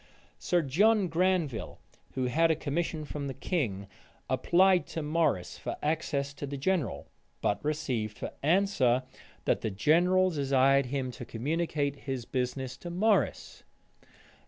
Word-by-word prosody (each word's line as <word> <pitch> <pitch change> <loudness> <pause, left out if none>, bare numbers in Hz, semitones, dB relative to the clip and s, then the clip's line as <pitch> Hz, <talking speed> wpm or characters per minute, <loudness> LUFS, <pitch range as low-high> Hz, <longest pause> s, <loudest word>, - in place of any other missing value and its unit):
Sir 175 -2 +1
John 195 +7 +3
Granville, 170 -7 0 0.4
who 130 - 0
had 165 +6 +3
a 160 - +3
commission 155 +1 -2
from 145 -1 -5
the 135 - -5
king, 120 - -2 0.5
applied 180 +8 +4
to 160 - -4
Morrice 150 - 0
for - - -4
access 145 -2 -1
to 145 0 -6
the 140 +1 -5
general; 155 - -1 0.3
but 100 - -1
received 130 -8 -2
for - - -5
answer, 145 -7 +2 0.4
that - - +1
the 110 - -1
general 180 - +3
desired 135 -2 +3
him 130 -1 -2
to 125 - -8
communicate 145 +4 -1
his 130 -4 -5
business 130 0 -3
to 175 - -8
Morrice. 205 +5 0
145 Hz, 135 wpm, -29 LUFS, 130-170 Hz, 0.5 s, applied